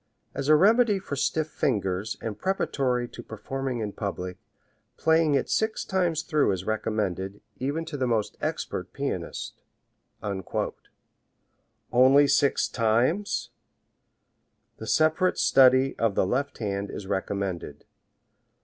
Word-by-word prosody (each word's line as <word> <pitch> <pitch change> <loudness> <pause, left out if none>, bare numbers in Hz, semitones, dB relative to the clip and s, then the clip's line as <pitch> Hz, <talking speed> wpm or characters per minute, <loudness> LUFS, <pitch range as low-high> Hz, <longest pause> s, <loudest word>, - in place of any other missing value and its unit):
As 140 - -3
a 155 - +8
remedy 215 +5 +4
for 185 -7 -5
stiff 155 +3 0
fingers 100 -6 -1
and 110 -2 -4
preparatory 130 -10 0
to - - -9
performing 125 +3 -4
in 105 -1 -3
public, 90 -3 -5 0.6
playing 160 -2 +3
it 135 - +1
six 220 0 0
times 175 -5 0
through 155 - +2
is 95 -1 -4
recommended, 100 -3 -2 0.2
even 145 +5 -2
to 160 -2 -5
the 130 -2 0
most 110 -3 0
expert - - -3
pianist." - - -4 2.3
Only 135 +3 +6
six 140 0 +3
times! 120 - 0 1.3
The 110 - -8
separate 155 - +2
study 130 0 +5
of 110 -4 +1
the - - +3
left 140 +8 -1
hand 100 -2 -3
is 100 - -7
recommended. 95 -5 -3
130 Hz, 120 wpm, -26 LUFS, 105-155 Hz, 2.3 s, a